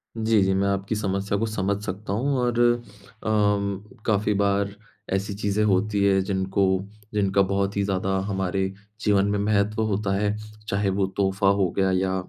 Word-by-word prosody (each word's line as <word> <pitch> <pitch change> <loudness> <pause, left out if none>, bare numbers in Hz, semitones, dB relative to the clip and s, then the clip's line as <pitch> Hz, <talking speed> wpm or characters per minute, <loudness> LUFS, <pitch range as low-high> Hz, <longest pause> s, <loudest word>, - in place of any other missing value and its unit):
जी, 110 -2 +2
जी। 95 0 +2
मैं 100 +1 +1
आपकी 100 +2 -1
समस्या 100 -1 -1
को 115 - 0
समझ 100 -2 -1
सकता 100 +1 -4
हूँ 135 +5 0
और 120 -1 0 0.6
अम 105 -2 +1 0.2
काफ़ी 105 -1 +2
बार 100 0 +1 0.4
ऐसी 100 +2 -1
चीज़ें 105 +1 0
होती 100 0 +2
हैं, 95 -1 +3
जिनको 95 0 0 0.5
जिनका 100 -1 +2
बहुत 100 +1 0
ही 100 - +2
ज़्यादा 95 0 -1
हमारे 95 -1 -1 0.3
जीवन 100 -2 +3
में 105 - +1
महत्व 105 +1 +1
होता 100 -2 0
है। 105 +1 0 0.3
चाहे 100 0 0
वो 95 0 +1
तोहफा 95 0 +1
हो 95 -3 +2
गया 95 -1 +3
या 95 0 +1
100 Hz, 165 wpm, -24 LUFS, 95-105 Hz, 0.6 s, हैं